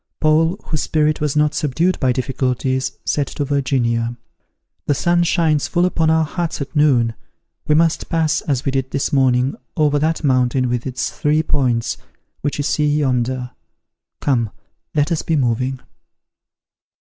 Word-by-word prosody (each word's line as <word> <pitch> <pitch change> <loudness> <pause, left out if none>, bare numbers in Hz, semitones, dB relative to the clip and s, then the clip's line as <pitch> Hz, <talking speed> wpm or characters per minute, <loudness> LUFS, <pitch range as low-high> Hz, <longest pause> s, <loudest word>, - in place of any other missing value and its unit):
Paul, 160 +5 +2
whose 155 - -2
spirit 155 -1 +1
was 150 -1 0
not 150 0 +2
subdued 165 +6 0
by 130 - +2
difficulties, 130 +1 -1
said 145 -2 0
to 145 - -3
Virginia, 120 -4 0 0.7
"The 145 - +2
sun 175 +4 +2
shines 160 -4 +2
full 175 0 +1
upon 165 -3 +1
our 160 0 +3
huts 170 +1 -3
at 140 +3 -6
noon: 130 -6 +3 0.5
we 150 - +3
must 165 +1 +1
pass, 160 -2 +1
as 135 -3 -2
we 135 - +1
did 135 -1 -1
this 140 +1 -2
morning, 130 -1 +3 0.2
over 145 -2 +3
that 160 +2 0
mountain 130 -2 +2
with 120 +1 -2
its 130 0 -3
three 150 +1 +1
points, 125 -7 0 0.4
which 145 - -2
you 145 - -1
see 150 +1 +1
yonder. 130 -3 0 0.7
Come, 120 -6 +1 0.5
let 150 +2 +1
us 165 - 0
be 165 - 0
moving." 130 0 0
145 Hz, 155 wpm, -19 LUFS, 130-155 Hz, 0.7 s, our